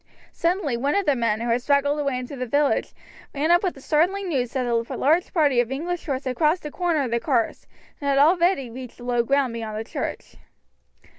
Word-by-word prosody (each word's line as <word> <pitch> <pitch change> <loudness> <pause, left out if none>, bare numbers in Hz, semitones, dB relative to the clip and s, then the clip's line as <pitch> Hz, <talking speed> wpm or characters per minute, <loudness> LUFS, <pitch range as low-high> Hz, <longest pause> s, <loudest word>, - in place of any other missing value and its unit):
Suddenly 335 -7 0
one 280 +4 0
of 400 -1 +1
the 290 -3 +3
men, 230 -3 0
who 235 - -2
had 240 +2 +1
straggled 285 +2 +2
away 280 -3 -1
into 250 +3 -6
the 255 -1 -4
village, 285 +4 +1 0.4
ran 300 +4 +1
up 350 +1 +5
with 370 -3 -1
the 270 - -13
startling 365 +7 +1
news 250 -6 -1
that 260 -2 -1
a 240 - -1 0.2
large 320 +6 +2
party 290 -7 +3
of 240 +1 0
English 340 +6 -3
horse 270 -2 -2
had 255 -1 -3
crossed 320 +2 +2
the 300 - -6
corner 340 -4 0
of 250 - -3
the 235 - +1
carse, 235 -2 -1 0.3
and 285 - -4
had 275 - +2
already 330 -3 +3
reached 250 0 -9
the 245 - -12
low 245 -1 +1
ground 270 0 +1
beyond 220 -2 -5
the 220 - -3
church. - - -6
280 Hz, 225 wpm, -24 LUFS, 245-315 Hz, 0.4 s, up